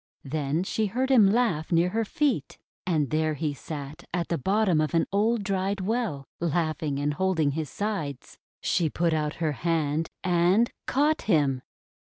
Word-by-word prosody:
Then 150 +3 -1
she 215 +2 0
heard 255 +6 -1
him 220 -7 +7
laugh 195 -9 +1
near 170 +1 +3
her 225 +4 0
feet. 235 - -1 0.3
And 155 -6 +1
there 155 0 +1
he 150 0 -2
sat 145 +1 -7
at 175 -1 -2
the 170 - 0
bottom 190 - +2
of 155 +2 -1
an 165 - +3
old 215 +2 +2
dried 195 0 -1
well, 195 - -2
laughing 155 -3 -1
and 145 +1 0
holding 165 -3 +1
his 155 +1 -3
sides. 175 -11 -4 0.2
She 170 -3 +1
put 170 +2 0
out 150 -1 -1
her 160 -2 0
hand, 160 0 0
and 180 +6 +3 0.2
caught 295 +3 +2
him. 140 -7 +3
170 Hz, 165 wpm, -27 LUFS, 150-200 Hz, 0.3 s, him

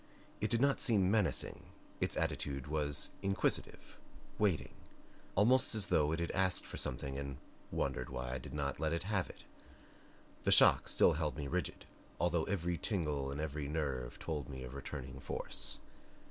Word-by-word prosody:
It - - 0
did 115 0 +2
not 140 0 +3
seem 105 -10 +5
menacing 105 -5 +1 0.4
its - - -1
attitude 70 -2 -1
was 75 -1 0
inquisitive, 95 0 -1 0.4
waiting; 100 -7 +1 0.6
almost 120 +5 +4
as 110 - +3
though 75 -1 +4
it 80 - -1
had 85 - -1
asked 95 -1 +2
for - - -7
something 70 0 -3
and 70 -1 -5 0.3
wondered 65 - -2
why 60 0 -4
I - - -1
did 65 - -8
not 70 -1 -2
let 80 +1 0
it 85 +1 -1
have 95 -2 0
it. - - -12 1.0
The - - +1
shock - - +7
still - - +5
held 75 -3 -1
me 75 -2 -3
rigid, 90 -1 -2 0.3
although 85 -2 +2
a 90 -3 -1
tingle 75 -8 -1
in 70 - -4
every 75 -1 -3
nerve 70 -5 -2
told 75 -4 -4
me 65 -2 -6
of 65 0 -8
returning 65 -1 -6
force. - - 0
75 Hz, 165 wpm, -35 LUFS, 70-95 Hz, 1.0 s, shock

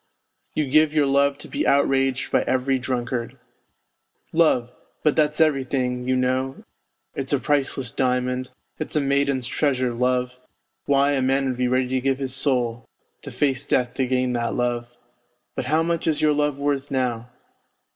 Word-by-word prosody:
You 155 - +1
give 155 +2 +3
your 150 -2 +4
love 140 0 +2
to - - -11
be 295 +2 -2
outraged 135 -1 +2
by - - +3
every 130 +1 +1
drunkard! 125 -2 -3 1.0
Love! 155 -7 +3 0.3
But 150 - +3
that's 150 -1 +1
everything, 130 -5 +1
you 130 - +2
know, 130 +1 -1 0.5
it's 135 +1 -3
a - - +4
priceless 135 -4 0
diamond, 125 0 -1 0.3
it's 155 - -5
a - - +4
maiden's 140 -2 +1
treasure, 130 -1 0
love 125 +1 0 0.5
why, 140 0 +3
a 140 -2 +1
man 135 +1 +1
would 130 -2 -2
be 125 0 +1
ready 130 0 +1
to 130 0 0
give 135 0 +1
his 135 -2 -3
soul, 125 -4 -1 0.3
to - - -8
face 140 -1 -1
death 125 -1 +1
to 130 -2 -1
gain 125 0 0
that 120 -1 -1
love. 120 -1 -1 0.7
But - - -3
how 155 +2 +2
much 170 0 -1
is 155 -2 +1
your 150 -1 +3
love 150 -1 0
worth 140 0 -1
now 125 -3 -2
130 Hz, 165 wpm, -23 LUFS, 125-140 Hz, 1.0 s, your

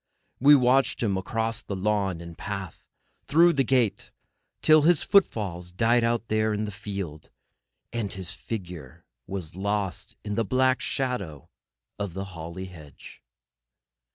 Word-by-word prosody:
We 145 +3 +8
watched 130 -1 +3
him 100 -4 +1
across 110 +4 -2
the 100 - -5
lawn 95 -3 0
and 85 -1 -9
path, 100 -4 -6 0.3
and - - -45
through 170 +3 +5
the 135 - +2
gate, 125 -4 +1 0.5
till 155 0 +7
his 165 +1 +4
footfalls 95 - +1
died 115 +6 +3
out 115 0 0
there 110 0 +1
in 105 +1 -2
the 105 - -5
field, 100 -7 -6 0.6
and 115 -4 -2
his 95 -3 -4
figure 90 - -7 0.2
was 90 -5 -5
lost 100 -1 -2
in 105 - -3
the 115 - +1
black 130 +4 +2
shadow 100 - -3 0.5
of 100 -4 -4
the 95 0 -3
holly 85 +3 -6
hedge. 80 -6 -13
105 Hz, 145 wpm, -26 LUFS, 90-120 Hz, 0.6 s, We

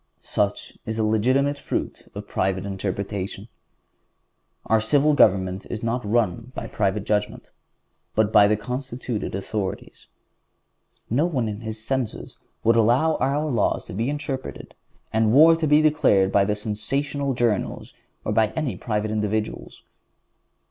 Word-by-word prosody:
Such - - -2
is 110 0 -4
the 110 - +1
legitimate 130 +7 +2
fruit - - -4
of - - -7
private 95 +1 -1
interpretation! 100 +1 -4 1.2
Our 110 -1 +3
civil 145 +6 +3
government 95 -7 +3
is 115 0 -5
run 115 +2 -1
not 115 +3 -1
by - - -4
private 100 -1 -1
judgment, 105 0 -2 0.6
but 110 0 +2
by 105 -2 +7
the 105 +1 +2
constituted 125 -2 -4
authorities. 100 0 -5 1.0
No 145 +9 +1
one 130 -9 -1
in 105 -1 -4
his 110 -1 -5
senses 130 -3 -3 0.3
would 115 +1 +4
allow 125 +8 +3
our 140 +4 0
laws 130 -7 0
to - - -9
be 115 +7 -1
interpreted, 145 -3 -5 0.4
and 110 0 +3
war 160 +4 +8
to 165 -1 -1
be 150 +1 +5
declared 105 -11 +3
by 100 +1 +3
sensational 135 +7 -2
journals, 115 -5 -1 0.3
or - - -1
by 110 -1 +4
any 140 - -2
private 105 -1 -2
individuals. 110 0 -3
110 Hz, 135 wpm, -24 LUFS, 105-135 Hz, 1.2 s, war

